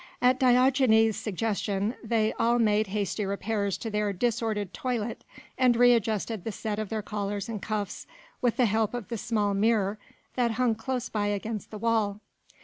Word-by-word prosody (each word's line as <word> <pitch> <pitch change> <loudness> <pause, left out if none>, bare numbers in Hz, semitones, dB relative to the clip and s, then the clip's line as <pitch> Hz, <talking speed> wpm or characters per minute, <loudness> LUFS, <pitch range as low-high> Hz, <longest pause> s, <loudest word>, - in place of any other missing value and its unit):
At 255 +1 +3
Diogenes' 250 -4 +4
suggestion 205 0 -1
they 220 -1 +1
all 235 +1 +3
made 215 -2 +2
hasty 205 +1 -2
repairs 200 0 -1
to 225 - -5
their 210 -1 0
disordered 220 -2 -1
toilet, 235 -3 -3 0.4
and 250 -2 +5
re 245 +1 +6
adjusted 220 -2 -1
the 225 - -3
set 210 0 -4
of 215 -2 -3
their 220 -2 -3
collars 205 0 -3
and 220 -3 -5
cuffs 210 -3 -4 0.3
with 245 -3 +1
the 250 - +4
help 220 +1 +1
of 240 -4 -6
the 230 - -3
small 210 -3 0
mirror 210 0 +1 0.3
that 240 -2 +1
hung 245 0 +2
close 250 +3 -3
by 205 -1 -1
against 205 +1 -3
the 215 - -7
wall. 215 -2 0
220 Hz, 170 wpm, -28 LUFS, 205-235 Hz, 0.4 s, re